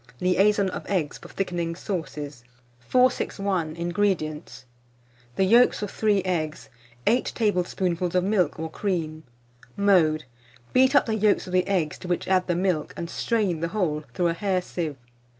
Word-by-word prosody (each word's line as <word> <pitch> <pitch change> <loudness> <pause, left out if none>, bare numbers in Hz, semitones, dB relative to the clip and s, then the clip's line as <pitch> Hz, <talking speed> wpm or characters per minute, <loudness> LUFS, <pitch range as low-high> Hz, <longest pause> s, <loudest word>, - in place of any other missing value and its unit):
LIAISON 195 +2 +3
OF - - -5
EGGS 175 -7 -1
FOR - - -12
THICKENING 175 -3 -2
SAUCES. 150 -8 -5 0.4
461. 195 - +1
INGREDIENTS. 170 -5 -2 0.7
The - - +2
yolks 230 +3 +4
of 205 - -4
3 205 -3 +1
eggs, 160 -5 -2 0.4
8 245 +3 +2
tablespoonfuls 180 -4 0
of 180 - +3
milk 185 -5 +1
or 160 0 -5
cream. 160 -5 -3 0.5
Mode. 175 -6 +3 0.5
Beat 260 +2 +4
up - - +5
the 225 - -1
yolks 215 -1 +2
of 185 - -8
the 185 0 +2
eggs, 180 -6 0
to - - -8
which 175 -1 -1
add 185 -1 +2
the 175 - +1
milk, 180 -4 -1
and 170 0 -5
strain 205 -8 0
the 170 - -1
whole 165 -6 -1
through 175 -1 +2
a - - 0
hair 190 +1 0
sieve. 160 -6 -4
180 Hz, 155 wpm, -25 LUFS, 165-200 Hz, 0.7 s, up